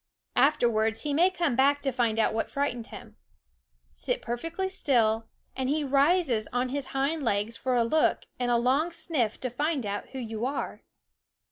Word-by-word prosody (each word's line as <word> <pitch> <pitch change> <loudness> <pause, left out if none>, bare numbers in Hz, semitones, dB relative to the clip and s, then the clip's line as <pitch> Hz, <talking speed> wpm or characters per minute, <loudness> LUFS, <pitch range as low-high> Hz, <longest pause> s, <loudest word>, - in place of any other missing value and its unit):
Afterwards 225 -6 +2
he 295 -1 -2
may 345 +6 +5
come 345 -8 0
back 280 +3 +4
to 270 - +1
find 235 -3 0
out 225 - +2
what 225 - -1
frightened 245 -5 -2
him. - - -11 0.8
Sit - - -2
perfectly 330 +11 -3
still, 230 -11 +1 0.3
and 260 0 -2
he 300 +1 +1
rises 275 - +2
on 245 +1 0
his 275 0 -3
hind 280 +4 -1
legs 220 -2 0
for 255 +2 -1
a 240 - +4
look 310 +7 +2 0.2
and 245 -1 0
a 240 - +4
long 270 +8 +2
sniff 315 -9 -1
to 255 - -2
find 290 0 -1
out 205 0 -4
who 270 - -8
you 225 -3 -5
are. 280 - -4
260 Hz, 175 wpm, -28 LUFS, 230-295 Hz, 0.8 s, may